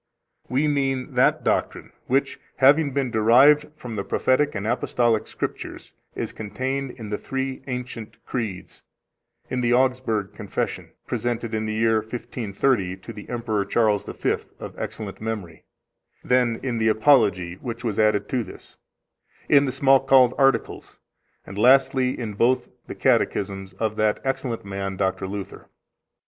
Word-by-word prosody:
We 135 +5 +1
mean 135 -3 -1
that - - +3
doctrine, - - -1 0.2
which, 135 +2 0 0.2
having 145 +2 +4
been 135 -2 -1
derived 130 +7 +5
from 120 -6 -8
the 100 - -2
Prophetic 145 +6 +1
and 100 0 -3
Apostolic 120 -1 +1
Scriptures, - - -6 0.2
is - - -4
contained 130 +6 -3
in 115 -3 -9
the 105 - -2
three 135 0 -4
ancient 125 -3 -6
Creeds, 110 -7 -5 0.7
in 125 - 0
the 120 0 +2
Augsburg 125 -5 0
Confession, - - -4 0.2
presented 120 -1 -3
in 110 0 -1
the 110 - -2
year 110 0 +2
1530 110 -3 -2
to 95 - -10
the 105 - -11
Emperor 115 -4 -1
Charles 105 0 +1
V, - - -1 0.2
of - - -8
excellent 105 -2 -6
memory, 105 -8 -5 0.6
then 125 -2 +2
in 125 -4 -2
the 110 - +2
Apology, 105 -7 +3
which 120 -1 -6
was 110 -4 -2
added 105 -1 +2
to 125 -2 0
this, 95 - -14 0.7
in 140 0 +5
the 130 - -1
Smalcald 135 -2 +5
Articles, 135 -1 0 0.5
and 100 +1 -7
lastly 130 +1 +4
in 110 -3 -4
both 120 +5 +1 0.2
the - - -7
Catechisms 95 -1 0
of 110 -1 -2
that 110 -1 +1
excellent 130 -5 -3
man, 95 -1 -4
Dr. 95 0 -1
Luther. 100 0 -7
115 Hz, 145 wpm, -24 LUFS, 105-130 Hz, 0.7 s, derived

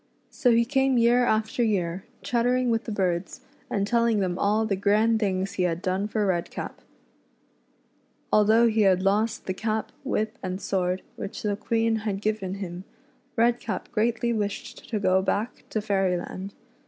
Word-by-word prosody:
So 255 - +2
he 235 0 +4
came 265 0 +2
year 240 +1 +4
after 220 +1 0
year, 190 -5 0 0.2
chattering 245 +1 +1
with 225 0 0
the 225 - -4
other - - -3 0.2
birds, 180 - -13 0.3
and 200 -2 0
telling 235 0 +2
them 185 -2 -1
all 210 +2 +2
the 205 -3 0
grand 215 +3 +3
things 195 -2 -1
he - - -2
had 170 -2 +1
done 190 +2 -1
for 215 -1 0
Redcap. 175 -3 -3 1.5
Although 220 +3 +5
he 220 -1 +2
had 185 -2 +4
lost 215 +4 +1
the 185 - -1
cap, 220 +2 -2
whip, 220 +1 -2
and 185 0 -3
sword, 185 -2 -1
which 195 - -6
the 205 -1 0
Queen 225 +1 0
had 210 -2 -3
given 210 -3 -2
him. 185 -2 -6 0.5
Redcap 235 -1 0
greatly 235 +2 +1
wished 205 -2 -4
to 225 - -1
go 190 -1 +3
back 210 +5 -2
to 215 - -1
Fairyland. 195 -1 -1
210 Hz, 165 wpm, -26 LUFS, 190-230 Hz, 1.5 s, Although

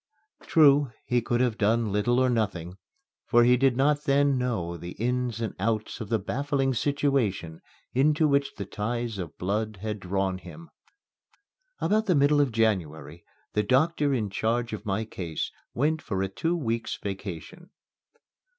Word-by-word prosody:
True, 145 -4 +5
he 125 -1 +1
could 120 +1 0
have 120 -3 0
done 110 +1 +2
little 105 +5 +1
or 130 - +4
nothing, 100 -7 -1 0.5
for 120 0 +5
he 125 +1 +5
did 130 -1 +2
not 145 +2 +2
then 140 -1 +3
know 110 -10 -2
the 85 +1 -7
ins 125 0 -1
and 110 -4 -2
outs 110 +3 -1
of 110 - -6
the 115 - +2
baffling 135 +5 -1
situation 125 - 0 0.3
into 150 +4 +3
which 140 -1 +1
the 100 - -5
ties 115 +2 -3
of 85 -4 -6
blood 105 +3 -2
had 105 -1 -3
drawn 95 0 -1
him. 165 - -12 1.1
About 215 +5 +1
the 180 - +3
middle 145 +1 +4
of 140 -4 +1
January 85 -8 -1 0.3
the 105 - +2
doctor 145 +6 +2
in 110 -7 -1
charge 115 +3 -1
of 105 0 -6
my 100 +3 -1
case 85 -7 -4 0.2
went 150 +4 +1
for 95 -2 -2
a - - 0
two 165 - -1
weeks' 115 -6 -2
vacation. 100 - -7
115 Hz, 160 wpm, -27 LUFS, 100-140 Hz, 1.1 s, True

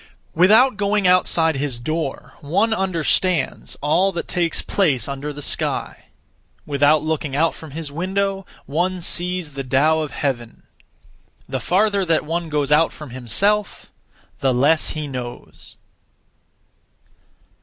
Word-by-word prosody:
Without 215 +8 +5
going 205 -1 +1
outside 165 -4 +3
his 135 -3 -3
door, 135 -2 -4
one 195 +10 +1
understands 185 -3 0
(all 170 +7 +2
that 170 - -4
takes 170 -2 0
place) 145 - +1
under 140 +2 -4
the 145 0 -7
sky; - - -2 0.6
without 145 +1 +3
looking 155 -3 -2
out 165 +3 +2
from 160 - -11
his 150 +1 -6
window, 195 +4 -1 0.2
one 180 +6 -1
sees 175 -1 -2
the 135 0 -4
Tao 145 +5 +2
of 155 -1 -2
Heaven. 120 -7 -4 0.8
The 130 0 -3
farther 200 - +1
that 165 -3 +1
one 165 +1 -3
goes 145 -2 -1
out 155 +2 +4
(from 150 -5 -10
himself), 190 - -1 0.5
the 130 -2 +1
less 145 +5 +3
he 155 - -3
knows. 125 -3 -8
160 Hz, 130 wpm, -21 LUFS, 140-185 Hz, 0.8 s, Without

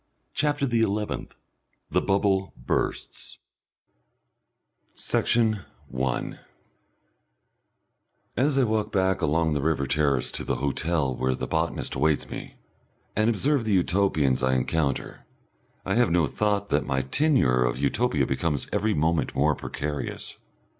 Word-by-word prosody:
CHAPTER 145 -1 +1
THE 120 -3 +1
ELEVENTH 105 -1 -2 0.6
The - - +2
Bubble 95 -1 +1
Bursts - - -3 1.6
Section 110 -3 +1 0.3
1 65 0 -2 2.0
As 135 +3 +2
I 135 - +5
walk 110 -2 0
back 95 -1 +1
along 80 +1 +2
the 75 - 0
river 75 -2 +1
terrace 70 -2 +1
to - - -4
the - - -1
hotel 70 0 0
where 65 +1 0
the - - -4
botanist 80 +1 -1
awaits 75 +2 +1
me, - - -7 0.6
and 110 +1 +3
observe 135 +4 +2
the 110 -2 0
Utopians 85 -8 +2
I 65 0 +2
encounter, 70 +1 -1 0.6
I 95 - 0
have 120 +2 +3
no 85 -1 +3
thought 100 +7 -1
that - - +2
my 65 -1 0
tenure 65 - +2
of - - 0
Utopia 70 - +1
becomes 70 +2 -1
every 105 +1 +1
moment 80 +2 0
more 75 +3 +3
precarious. 75 +1 -5
85 Hz, 125 wpm, -26 LUFS, 70-105 Hz, 2.0 s, I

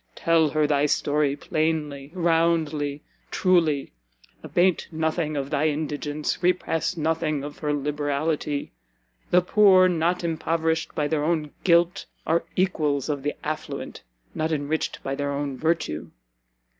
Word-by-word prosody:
Tell 165 -2 +3
her 155 +1 +1
thy 145 0 +2
story, 145 -1 +1
plainly, 150 -2 -2
roundly, 160 -4 +1 0.3
truly; 165 -7 +2 0.5
abate 180 0 +1
nothing 160 -1 -1
of 140 +1 -3
thy 150 0 +2
indigence, 150 0 -2
repress 175 -1 0
nothing 155 -2 0
of 145 0 -8
her 150 -1 -1
liberality. 145 +1 -1 0.6
The 180 0 +4
Poor 190 -1 +6
not 175 +1 0
impoverished 160 -1 -1
by 150 - 0
their 150 -1 0
own 155 -2 0
Guilt, 170 0 +3 0.2
are 165 +1 +1
Equals 155 -7 0
of 145 -2 -1
the 145 +2 -2
Affluent, 155 +1 -5 0.3
not 155 +1 -1
enriched 155 +1 -2
by 135 - -2
their 140 +1 -2
own 140 -1 -3
Virtue. 160 - -1
155 Hz, 130 wpm, -25 LUFS, 145-165 Hz, 0.6 s, Poor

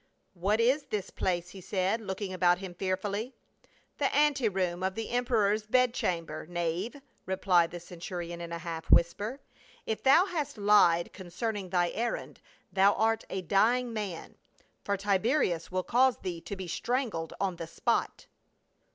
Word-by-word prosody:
"What 195 +4 0
is 260 +5 +3
this 205 -3 -4
place?" 175 -1 -1
he 195 - -10
said, 190 +4 0
looking 190 -1 -4
about 180 -1 +3
him 185 -1 -7
fearfully. 200 +6 -2 0.6
"The 280 - +2
ante 285 -5 +3
room 180 -2 -1
of 190 0 -1
the 225 -1 -4
emperor's 220 -4 +1
bed 250 +1 +3
chamber, 165 -7 -2
knave," 175 - -2 0.3
replied 185 -3 +3
the 175 - -7
centurion, 175 0 -6
in 170 0 -6
a 170 - -3
half 165 -1 -6
whisper. 205 +10 +3 0.2
" - - -27
If 220 - -2
thou 275 +7 +6
hast 300 - -3
lied 200 -5 +4
concerning 190 +2 -4
thy 175 -1 +1
errand, 235 +1 -3 0.3
thou 195 +2 +5
art 225 0 +1
a 190 - -3
dying 230 +7 +2
man, 205 -6 -5 0.5
for 200 0 0
Tiberius 195 - +1
will 185 0 -1
cause 255 +4 +3
thee 175 -3 -5
to 200 - -6
be 190 -2 -6
strangled 215 - -2
on 190 -3 -1
the 165 - -6
spot." 165 - -1
195 Hz, 160 wpm, -30 LUFS, 175-225 Hz, 0.6 s, thou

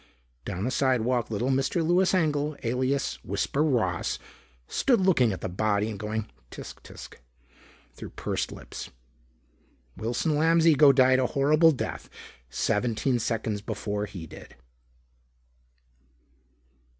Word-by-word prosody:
Down 95 -1 -4
the 125 - -1
sidewalk, 125 -3 +1
little 115 +5 -1
Mr. 135 +5 0
Louis 180 +3 +3
Engel, 150 -3 0
alias 130 +3 -1
Whisper 145 - -1
Ross, 110 - 0 0.5
stood 245 -5 +2
looking 170 - +3
at 95 - -5
the - - -2
body 105 +3 0
and 100 - -7
going 110 +1 -3 0.2
"Tsk! - - -10
Tsk!" - - -12 0.7
through - - -9
pursed - - -3
lips. - - -9 1.1
Wilson 120 - -1
Lamb's 165 +2 +3
ego 150 -2 +7
died 130 -1 +4
a 130 - +2
horrible 155 +4 +4
death 140 - -5 0.4
seventeen 115 - 0
seconds 110 -2 -2
before 105 -1 -3
he 95 -5 -8
did. - - -13
125 Hz, 120 wpm, -27 LUFS, 110-150 Hz, 1.1 s, ego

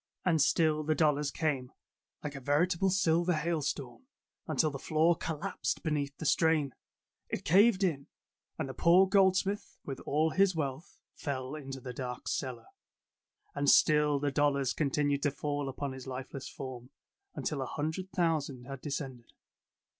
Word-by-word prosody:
And 165 -4 +3
still 155 +1 +3
the 155 +1 0
dollars 150 -2 +2
came, 140 -4 -2 0.5
like 150 - -4
a 140 - -6
veritable 170 +7 +2
silver 175 -1 +2
hail 160 0 0
storm, 140 - -4 0.4
until 155 -2 +1
the 135 - -6
floor 160 +4 +3
collapsed 165 +4 -3
beneath 145 -3 -1
the 160 - -6
strain. 155 -4 +2 0.6
It - - -4
caved 200 +3 +5
in, 145 -7 0 0.5
and - - -2
the 130 - -6
poor 180 +6 +5
goldsmith 195 +1 +2
with 135 - -5
all 155 +2 +2
his 190 0 +3
wealth 145 +2 -4 0.2
fell 130 -2 -4
into 135 -3 -6
the 125 -1 -7
dark 125 0 -6
cellar. 120 -4 -3 0.9
And 145 0 +1
still 150 -2 +5
the 145 0 -1
dollars 140 -3 +2
continued 145 -1 0
to 145 - +2
fall 145 0 -3
upon 140 +1 -4
his 130 0 -9
lifeless 130 +1 -6
form, 125 -2 -8 0.5
until 150 -3 -2
a 130 - -3
hundred 160 +7 -3
thousand 150 -7 -1
had 135 -1 -7
de 150 - -5
scended. 130 -4 -5
150 Hz, 155 wpm, -31 LUFS, 135-165 Hz, 0.9 s, caved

